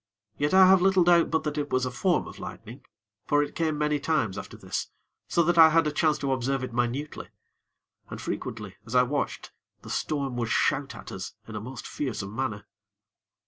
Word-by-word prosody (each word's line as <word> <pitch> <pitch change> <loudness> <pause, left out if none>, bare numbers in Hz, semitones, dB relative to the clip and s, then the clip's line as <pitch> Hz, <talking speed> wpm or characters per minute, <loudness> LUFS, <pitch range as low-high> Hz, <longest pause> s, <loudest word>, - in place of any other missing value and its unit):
Yet 145 +1 0
I 190 0 +8
have 190 -1 +6
little 190 -1 +4
doubt 170 -1 +4
but 160 - 0
that 150 0 -2
it 145 0 -3
was 130 0 +1
a 125 - -3
form 175 +8 +1
of - - -11
lightning; 120 +5 -9 0.4
for 145 0 +3
it 145 - -6
came 160 -2 -1
many 150 0 +1
times 135 -10 0
after - - -8
this, - - -4 0.4
so 170 - +2
that 170 +1 +2
I 160 -1 +10
had 155 -2 +2
chance 155 -1 +2
to 140 -1 -2
observe 130 +1 -1
it 130 -2 -5
minutely. 120 +5 -2 0.8
And - - -7
frequently, 105 -4 -5
as 115 +3 -7
I 125 - +6
watched, 140 +3 -3 0.3
the - - -8
storm 140 -4 -2
would 115 -1 -1
shout - - +1
at - - -10
us - - -6
in 110 - -8
a 105 - -4
most 125 +4 -8
fearsome 110 -7 -4
manner. 115 -5 -3
140 Hz, 200 wpm, -27 LUFS, 120-160 Hz, 0.8 s, I